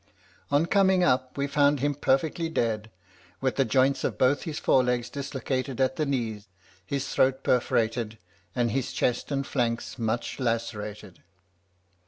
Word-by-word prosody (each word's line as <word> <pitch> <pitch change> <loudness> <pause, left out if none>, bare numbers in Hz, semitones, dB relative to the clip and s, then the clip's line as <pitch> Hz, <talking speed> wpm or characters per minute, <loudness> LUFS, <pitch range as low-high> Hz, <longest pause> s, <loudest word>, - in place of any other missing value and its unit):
"On 145 +3 +3
coming 190 0 +3
up, 130 -2 +1
we 140 - +1
found 145 0 +3
him 145 +2 +1
perfectly 145 +4 0
dead, 110 -7 -1 0.5
with 130 -1 0
the 135 - +3
joints 130 +4 +2
of - - -1
both 130 +3 +3
his 155 -3 -4
forelegs 125 -2 +2
dislocated 135 -2 -3
at 130 0 +2
the 155 - -1
knee, 115 -6 -2 0.4
his 140 +7 -3
throat 130 +1 +2
perforated, 115 -2 +1 0.4
and 120 -2 +1
his 135 +1 -2
chest 125 +4 -1
and 140 -1 -1
flanks 120 -2 -2
much 115 +3 -2
lacerated. 110 -5 -3
130 Hz, 145 wpm, -27 LUFS, 115-140 Hz, 0.5 s, On